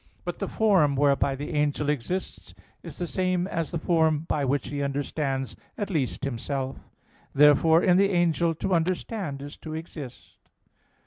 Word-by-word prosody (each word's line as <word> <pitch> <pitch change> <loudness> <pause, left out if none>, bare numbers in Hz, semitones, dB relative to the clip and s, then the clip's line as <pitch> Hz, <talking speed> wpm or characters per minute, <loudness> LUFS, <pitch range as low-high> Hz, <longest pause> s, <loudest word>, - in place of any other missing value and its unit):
But - - -4
the - - -2
form 190 -10 +3
whereby 140 -1 +2
the 145 +4 -6
angel 150 0 0
exists 150 +6 -3 0.3
is - - -9
the 175 - -2
same 185 0 0
as 165 -4 -2
the 170 - -2
form 160 -2 +2
by 150 - 0
which 140 +1 0
he 145 0 -3
understands 140 -1 -2 0.2
at 205 -1 -3
least 145 -5 -1
himself. 135 +1 -3 0.6
Therefore 150 +3 +6
in 180 -1 +5
the 195 +1 +4
angel 170 -2 +2
to 185 - -2
understand 170 -3 -1
is 145 +1 -9
to 155 -1 -7
exist. 155 -5 -9
155 Hz, 155 wpm, -26 LUFS, 140-175 Hz, 0.6 s, Therefore